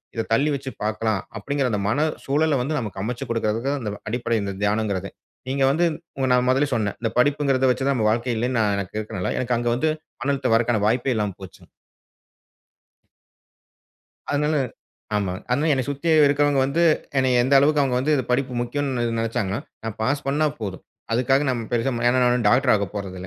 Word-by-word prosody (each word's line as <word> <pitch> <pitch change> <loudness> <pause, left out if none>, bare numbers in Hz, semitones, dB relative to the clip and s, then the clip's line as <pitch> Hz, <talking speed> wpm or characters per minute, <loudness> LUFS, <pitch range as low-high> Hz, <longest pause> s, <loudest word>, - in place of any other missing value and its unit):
இத 115 - -2
தள்ளி 140 +6 +3
வச்சு 135 -1 -6
பார்க்கலாம். 110 -1 -1 0.2
அப்டிங்கிற 140 +3 -1
அந்த 105 -2 -1
மன 150 +8 +2 0.2
சூழல 150 +1 +2
வந்து 150 +4 -1
நமக்கு 105 -5 -5
அமைச்சு 120 +2 -4
குடுக்கறதுக்கும் 115 0 -2
அடிப்படை 115 0 -1
இந்த 100 - -3
தியானம்ங்குறதே. 100 -2 -1 0.4
நீங்க 135 0 0
வந்து 165 +5 +2 0.5
நான் 125 0 +2
முதலே 135 +3 +3
சொன்ன. 105 -3 -1
இந்த 115 - 0
படிப்புங்குறது 135 -1 +2
வச்சு 130 - -2
தான் 140 - +2
நம்ம 110 -3 +1
வாழ்க்கை 120 +2 -1
இல்லன்னு 125 +2 0
நான் 105 -2 +2
எனக்கு 100 +1 -5
இருக்கனால. 95 -4 -3
எனக்கு 125 -1 0
அங்க 120 0 0
வந்து 155 +6 +1 0.3
மணத் 140 -1 -1
தவருவதற்கான 115 -1 +3
வாய்ப்பே 125 +3 +1
இல்லாம 105 -3 -1
போச்சுங்க. 95 - -12 2.6
அதனால 150 +1 +1 0.6
ஆமா. 100 -3 -1 0.2
அதனால 145 +6 +2
என்னை 130 -2 +1
சுத்தி 145 +4 -3 0.2
இருக்கவங்க 145 0 +2
வந்து 140 +6 0 0.4
என்னைய 130 -2 +3
எந்த 135 +2 +3
அளவுக்கு 145 +2 +3
அவங்க 130 -3 0
வந்து 150 +4 +1 0.2
படிப்பு 130 +1 0
முக்கியம்னு 130 0 -2
இது - - -1
நெனச்சாங்கன்னா, 115 -3 -1 0.3
நான் 110 -1 -4
பாஸ் 140 +5 0
பண்ணா 145 +3 +2
போதும். 100 -4 -5 0.3
அதுக்காக 135 +4 +2
நான் 125 -2 0
பெருசா 120 +2 +1 0.2
ஏன்னா 130 +1 +3
நான் 120 -2 +2
டாக்டர் 125 +3 +4
ஆகப் 100 -3 -1
போறதில்ல. 95 -2 -6
125 Hz, 170 wpm, -23 LUFS, 110-140 Hz, 2.6 s, டாக்டர்